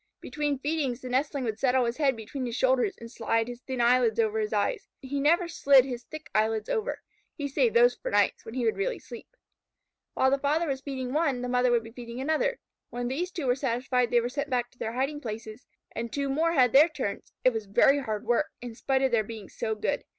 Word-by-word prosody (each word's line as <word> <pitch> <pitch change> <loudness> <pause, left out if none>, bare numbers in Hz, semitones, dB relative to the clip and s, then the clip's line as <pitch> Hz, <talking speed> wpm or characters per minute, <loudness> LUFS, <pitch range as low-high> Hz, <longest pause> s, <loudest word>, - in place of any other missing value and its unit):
Between 295 -2 -2
feedings 275 -3 -2
the 255 - -7
nestling 275 +2 0
would 220 -2 -3
settle 255 -1 +3
his 235 +1 -2
head 280 -4 +2
between 245 +4 -5
his 235 - -4
shoulders, 260 +10 +2
and 230 0 -10
slide 230 -1 0
his 245 0 -8
thin 260 -1 -5
eyelids 240 -2 +3
over 220 -1 +1
his 215 -1 -2
eyes. 205 -2 -1
He 280 +1 -4
never 335 +5 +3
slid 280 -5 +5
his 245 -2 -6
thick 310 0 -9
eyelids 220 0 +1
over. 450 +3 -2 0.3
He 285 -3 -3
saved 455 - +1
those 485 +1 +6
for - - -6
night, - - +3
when 225 - -10
he 250 -2 -1
would 225 - +1
really - - -1
sleep. - - -11 0.9
While 265 - +3
the 275 - +2
father 305 +4 +1
was 270 -2 -2
feeding 260 -2 -4
one, 280 -5 +1
the - - -2
mother 250 0 +3
would 240 -1 +2
be 225 - -11
feeding 235 0 -8
another. 315 - 0 0.3
When 245 0 -3
these 340 +8 -2
two 340 -6 -5
were 250 - +3
satisfied 250 -1 0
they 240 0 +3
were 235 - -2
sent 285 +3 -3
back 245 -2 -1
to 250 - -28
their 225 - -3
hiding 275 +4 -2
places 220 0 -7 0.2
and 230 0 -5
two 280 -1 -2
more 325 +5 +1
had 255 -6 +4
their 295 +5 +7
turns. 265 -10 -5
It 255 - +4
was 220 -2 -4
very 270 +8 +4
hard 215 -6 -4
work, 240 +6 +2
in 240 -1 -7
spite 265 +3 0
of 265 - +2
their 230 -2 +3
being 215 -2 -9
so 220 -1 -3
good. 210 - -2
255 Hz, 235 wpm, -28 LUFS, 235-285 Hz, 0.9 s, their